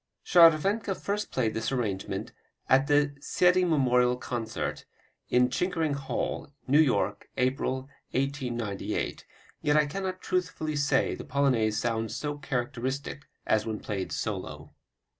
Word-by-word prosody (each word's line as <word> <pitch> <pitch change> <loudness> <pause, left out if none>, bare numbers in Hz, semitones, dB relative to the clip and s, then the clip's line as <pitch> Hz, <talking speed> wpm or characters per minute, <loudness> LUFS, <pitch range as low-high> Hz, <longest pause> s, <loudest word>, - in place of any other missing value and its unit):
Scharwenka 185 +5 +5
first 205 +2 -3
played 115 -4 0
this 110 +2 -2
arrangement 110 -7 -2 0.4
at 135 +2 +4
a 145 0 +4
Seidl 180 +4 +3
memorial 125 -4 +3
concert, 120 -3 -4 0.5
in 125 0 +4
Chickering 165 -2 0
Hall, 140 0 -3
New 140 +3 +4
York, 100 -9 +1
April, 130 +1 0 0.3
1898. 125 -6 -2 0.3
Yet 150 0 +3
I 150 - +5
cannot 185 +4 -4
truthfully 180 -5 -2
say 140 -1 +2
the - - -6
Polonaise 125 -7 +1
sounds 115 -1 -1
so 145 -1 -3
characteristic 135 0 -3 0.2
as 110 0 +1
when 110 -1 -3
played 100 -3 -4
solo. - - -4
135 Hz, 120 wpm, -28 LUFS, 120-155 Hz, 0.5 s, Scharwenka